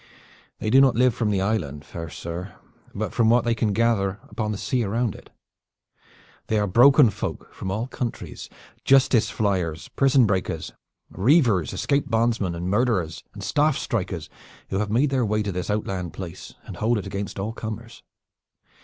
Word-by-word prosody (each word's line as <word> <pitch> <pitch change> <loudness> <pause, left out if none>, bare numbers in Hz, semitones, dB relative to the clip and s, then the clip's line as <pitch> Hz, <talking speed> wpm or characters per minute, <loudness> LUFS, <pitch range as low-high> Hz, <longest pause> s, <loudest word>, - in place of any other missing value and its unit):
"They 110 - -2
do 135 - +7
not 135 -4 +4
live 125 0 +4
from 110 -2 -1
the 100 -2 +1
island, 80 -9 -2
fair 80 -1 -7
sir, 85 +5 -7 0.4
but - - -3
from 115 -1 +3
what 120 +1 +4
they 120 - +2
can 110 -2 0
gather 105 -3 +1
upon 105 -2 -2
the 105 - -3
sea 125 +3 -1
around 115 +1 -1
it. - - -14 1.2
They 110 - +1
are 105 - +2
broken 125 +5 +6
folk - - -6
from 95 - -5
all 105 +5 -1
countries, 125 -2 -6 0.3
justice 130 -4 +4
fliers, 90 -6 -1
prison 135 -2 +4
breakers, 95 -3 -2 0.4
reavers, 110 - +3
escaped 140 0 0
bondsmen, 110 -6 0
murderers 100 -6 0
and 100 - -8
staff 145 +7 +2
strikers 90 -7 -3 0.4
who 95 - 0
have 105 -1 -1
made 130 +6 +2
their 130 -2 +2
way 105 0 0
to 100 - -2
this 90 +1 -4
outland 95 -4 -2
place 90 -2 -8
and - - -8
hold 115 +2 +1
it 105 - -4
against 100 +1 -5
all 105 +3 -3
comers. 115 +1 -7
105 Hz, 170 wpm, -24 LUFS, 95-120 Hz, 1.2 s, do